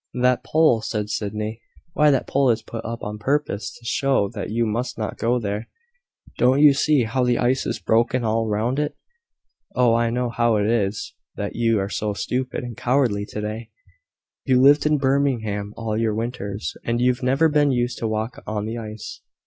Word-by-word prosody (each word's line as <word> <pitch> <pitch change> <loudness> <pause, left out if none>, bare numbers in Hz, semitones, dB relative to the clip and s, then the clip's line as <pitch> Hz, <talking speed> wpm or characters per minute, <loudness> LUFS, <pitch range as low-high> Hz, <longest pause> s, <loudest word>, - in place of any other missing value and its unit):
"That 125 0 +2
pole!" 155 -8 +3
said 105 -1 -3
Sydney. 110 +2 -3 0.3
"Why, 150 -1 +4
that 135 -3 +2
pole 135 -1 +2
is 115 -1 +1
put 115 0 -7
up 115 +1 -6
on 105 +1 -5
purpose 135 -2 -1
to 120 - -19
show 130 -4 +1
that 105 -4 -5
you 115 +2 0
must 115 +4 -2
not 110 -2 -4
go 120 +2 +2
there. 105 -1 -4 0.7
Don't 130 +3 +4
you 145 -1 +7
see 140 -1 +3
how 125 +3 0
the 125 -1 +2
ice 125 +2 +1
is - - -2
broken 115 +2 +1
all 110 0 0
round 110 +6 0
it? 150 0 -2 0.8
Oh, 125 -2 +4
I 115 0 +2
know 125 0 -1
how 120 -1 +2
it 105 -1 +1
is 105 -2 -1 0.2
that - - -4
you 115 -1 +2
are 95 -1 -1
so 105 0 -2
stupid 125 +5 -3
and 120 -2 -6
cowardly 120 -5 +1
to 105 - -5
day. 110 +2 -5 0.7
You've 130 -1 +3
lived 145 +2 +6
in 150 0 +3
Birmingham 125 -7 0
all 115 -1 -2
your 110 -1 0
winters, 110 -3 -4
and 120 0 -1
you've 125 0 +2
never 135 +5 +3
been 145 -2 +3
used 120 -1 -1
to 115 - -1
walk 110 +2 -3
on 105 -1 -2
the 115 +2 -4
ice." 110 -1 -8
115 Hz, 195 wpm, -23 LUFS, 110-130 Hz, 0.8 s, you